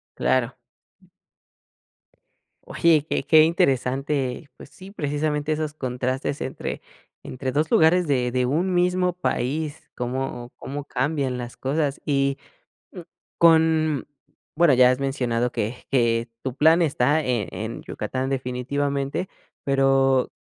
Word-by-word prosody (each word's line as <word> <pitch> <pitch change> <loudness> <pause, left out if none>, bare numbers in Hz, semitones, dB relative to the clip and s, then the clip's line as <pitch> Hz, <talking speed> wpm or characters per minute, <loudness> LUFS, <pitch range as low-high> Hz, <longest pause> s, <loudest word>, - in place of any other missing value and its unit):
Claro. 130 0 0 2.0
Oye, 160 -3 +2
qué - - -1
qué 155 +3 +6
interesante, 135 -2 0
pues - - -13
sí, 190 +1 -13
precisamente 150 -3 -2
esos 155 -1 -3
contrastes 130 0 -3
entre - - -5 0.4
entre 130 +1 -4
2 150 +3 0
lugares 165 +2 +4
de 125 -4 +1
de 125 0 +1
un 170 +8 0
mismo 180 0 +2
país, 155 -2 -3
cómo 125 -1 -4
cómo 145 +2 -6
cambian 135 -1 -1
las 120 -1 -7
cosas 140 +1 -1
y, 140 -1 +1
mm, - - -25 0.9
con 160 -3 +3 0.5
bueno, 165 -3 +4
ya 125 0 +6
has 130 - 0
mencionado 125 -3 -1
que 115 +4 -4
que 115 -3 +1
tu 130 -2 -4
plan 160 +4 +4
está, 150 -1 +2
eh, 120 -6 -1
en - - -5
Yucatán 130 +1 -4
definitivamente, 140 +5 -2 0.4
pero, 135 -1 +2
140 Hz, 120 wpm, -23 LUFS, 125-155 Hz, 2.0 s, qué